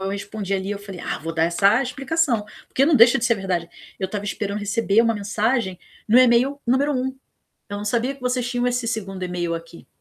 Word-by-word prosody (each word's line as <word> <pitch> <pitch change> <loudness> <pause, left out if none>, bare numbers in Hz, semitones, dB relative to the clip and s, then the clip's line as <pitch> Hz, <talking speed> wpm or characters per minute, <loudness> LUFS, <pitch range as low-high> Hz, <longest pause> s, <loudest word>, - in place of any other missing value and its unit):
eu 195 - -2
respondi 200 0 -5
ali, 190 +1 -2
eu 205 - -3
falei: 195 -3 -9
"Ah, - - -3
vou 165 +2 -5
dar 165 0 +2
essa 200 +7 +3
explicação", 270 -3 0 0.2
porque 270 - +2
não 295 -1 +4
deixa 235 +1 +7
de 235 - -2
ser 235 -3 +3
verdade. 180 -3 -2 0.3
Eu 190 - -1
estava 205 +1 -5
esperando 200 +1 -3
receber 205 +1 +2
uma 230 -1 +2
mensagem 210 -1 -1 0.3
no 230 +4 +6
e-mail 255 +3 +4
número 270 +4 +2
1. 260 0 -2 0.5
Eu 205 0 -5
não 205 - -5
sabia 240 +5 0
que 275 - -19
vocês 250 -1 -1
tinham 245 0 -1
esse 245 -1 0
2º 195 -4 -4
e-mail 175 -1 -2
aqui. 165 0 -9
215 Hz, 215 wpm, -22 LUFS, 195-250 Hz, 0.5 s, deixa